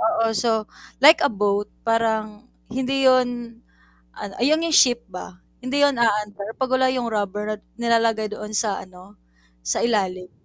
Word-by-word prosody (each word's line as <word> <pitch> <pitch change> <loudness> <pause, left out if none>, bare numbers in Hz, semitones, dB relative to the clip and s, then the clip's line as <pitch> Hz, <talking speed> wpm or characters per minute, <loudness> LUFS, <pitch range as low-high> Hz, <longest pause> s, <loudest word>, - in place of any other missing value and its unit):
oo, 225 0 +1
so, 225 -1 +1 0.4
like 320 +3 +8
a - - +4
boat 205 0 -1 0.2
parang 225 0 -1 0.2
hindi 265 +2 -1
'yon 245 -2 +1 0.5
ano, 200 - -8
ah, - - -4
'yong 310 +4 +2
'yong 320 - -1
ship 245 -2 +5
ba, 180 0 -9 0.2
hindi 275 +3 -1
yun 285 -3 +3
aandar, 210 -2 -1
'pag 260 -1 -2
wala 260 0 +3
'yong 245 -3 -2
rubberant 210 0 -3 0.2
nilalagay 230 -2 +1
doon 210 0 -8
sa 210 -3 -1
ano 185 +2 -16 0.4
sa - - -2
ilalim. 185 -5 -1
225 Hz, 155 wpm, -22 LUFS, 205-250 Hz, 0.5 s, like